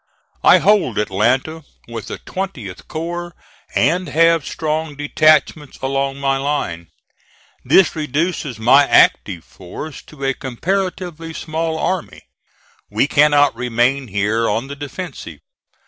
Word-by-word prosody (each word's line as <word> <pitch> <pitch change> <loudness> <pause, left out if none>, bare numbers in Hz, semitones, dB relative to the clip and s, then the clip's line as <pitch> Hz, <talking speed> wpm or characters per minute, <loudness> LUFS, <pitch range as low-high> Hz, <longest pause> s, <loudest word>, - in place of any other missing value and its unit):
I - - +7
hold 200 - +2
Atlanta 130 +10 0 0.2
with 115 -2 -7
the - - -5
20th 135 - -6
corps, 175 +1 -5 0.4
and 175 +8 +2
have 165 0 +3
strong 155 -1 -3
detachments 150 0 +2
along 135 0 -1
my 135 -1 0
line. 135 - -3 0.8
This 190 -3 +4
reduces 150 - -2
my 130 +6 +5
active 90 -4 +3
force 95 - -9
to 145 -3 -11
a 135 - +1
comparatively 165 +4 -3
small 160 0 -3
army. 185 +1 -3 0.7
We - - +1
cannot 145 0 +4
remain 125 +2 0
here 105 +3 0
on 115 +6 -2
the 140 - -6
defensive. 145 - -7
145 Hz, 115 wpm, -18 LUFS, 125-165 Hz, 0.8 s, I